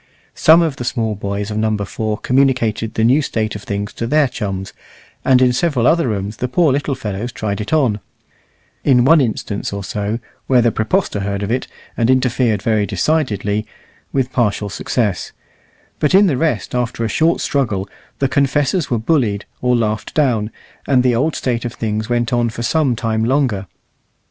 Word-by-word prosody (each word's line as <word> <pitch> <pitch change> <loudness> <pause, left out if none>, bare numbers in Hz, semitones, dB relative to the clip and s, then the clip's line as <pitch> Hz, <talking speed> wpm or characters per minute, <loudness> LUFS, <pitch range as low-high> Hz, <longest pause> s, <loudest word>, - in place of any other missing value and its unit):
Some 165 +2 +5
of 155 -5 -2
the - - -4
small 115 -3 -1
boys 100 +1 -4
of 105 - -3
Number 110 -2 0
4 110 0 -3
communicated 125 -5 +1
the 110 - +1
new 130 +6 +4
state 110 -6 -2
of 105 - -6
things 100 0 -4
to 115 - -4
their 150 +2 +3
chums, 95 -6 -5 0.5
and 130 -1 +4
in 125 -1 +4
several 135 -4 +1
other 165 0 +3
rooms 105 -1 -3
the 125 - -2
poor 150 +4 +3
little 140 0 -1
fellows 110 0 -4
tried 105 -2 -3
it 105 - -6
on 130 -10 +2 0.8
in 125 -3 +4
one 160 +2 +6
instance 110 -4 -2
or 100 0 -4
so, 105 +3 -2 0.3
where 125 -3 +4
the 120 - +3
praepostor 110 - 0
heard 100 0 -2
of 100 - -2
it 130 +2 -1 0.3
and 115 0 +1
interfered 125 -5 +2
very 110 -3 +1
decidedly, 110 - 0 0.4
with 135 -2 -1
partial 105 -4 0
success; 105 -1 -2 0.7
but 150 +4 +2
in 200 +2 +7
the 160 -8 +2
rest, 155 +2 -1
after 120 -2 -1
a - - +1
short 160 +9 +2
struggle, 110 -9 -1 0.3
the 135 - +1
confessors 140 +4 +1
were 120 - +1
bullied 115 -4 0 0.2
or 125 0 +2
laughed 110 -2 -2
down, 120 -8 +1 0.4
and 130 -3 +3
the 125 -1 +3
old 145 +7 0
state 120 -2 -1
of 120 -1 -4
things 110 0 -3
went 120 -1 0
on 120 -1 +2
for 115 +1 -6
some 140 -2 +1
time 110 -1 -1
longer. 120 -6 0
120 Hz, 185 wpm, -18 LUFS, 105-135 Hz, 0.8 s, in